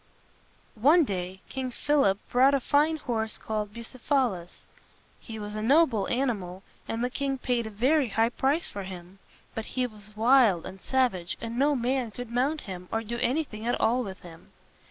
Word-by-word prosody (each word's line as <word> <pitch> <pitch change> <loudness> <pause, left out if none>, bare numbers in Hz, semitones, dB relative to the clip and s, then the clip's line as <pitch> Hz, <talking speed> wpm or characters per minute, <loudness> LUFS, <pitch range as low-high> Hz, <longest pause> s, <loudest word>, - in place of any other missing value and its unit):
One 315 +7 +6
day 190 -5 -4
King 260 -1 -4
Philip 260 -6 +2 0.2
bought 265 +3 +5
a - - +2
fine 300 +4 +2
horse 225 -6 -2
called 215 -1 -3
Bu 235 +2 -8
ceph´a 255 +1 0
lus. 175 -1 -10 0.5
He 225 -2 -8
was 210 -1 -6
a 215 - -3
noble 255 -4 +3
an 260 +1 +1
i - - 0
mal, 185 -2 -8 0.2
and 225 +1 -2
the 250 - +1
king 275 0 -1
paid 245 -3 -1
a - - -5
very 260 +7 +2
high 225 +2 +2
price 275 +6 +1
for 200 - -6
him. 185 0 -9 0.3
But 225 - -4
he 255 - +2
was 215 -2 -10
wild 225 -6 +5
and 190 0 -9
savage, 240 -10 0
and 230 0 -5
no 290 +1 +3
man 250 -1 0
could 240 +2 -8
mount 270 +6 0
him, 180 -2 -8
or 225 0 -1
do 235 +2 -4
anything 245 -4 -1
at 240 - +1
all 245 +3 +2
with 190 -4 -8
him. 165 -2 -14
235 Hz, 195 wpm, -27 LUFS, 205-265 Hz, 0.5 s, One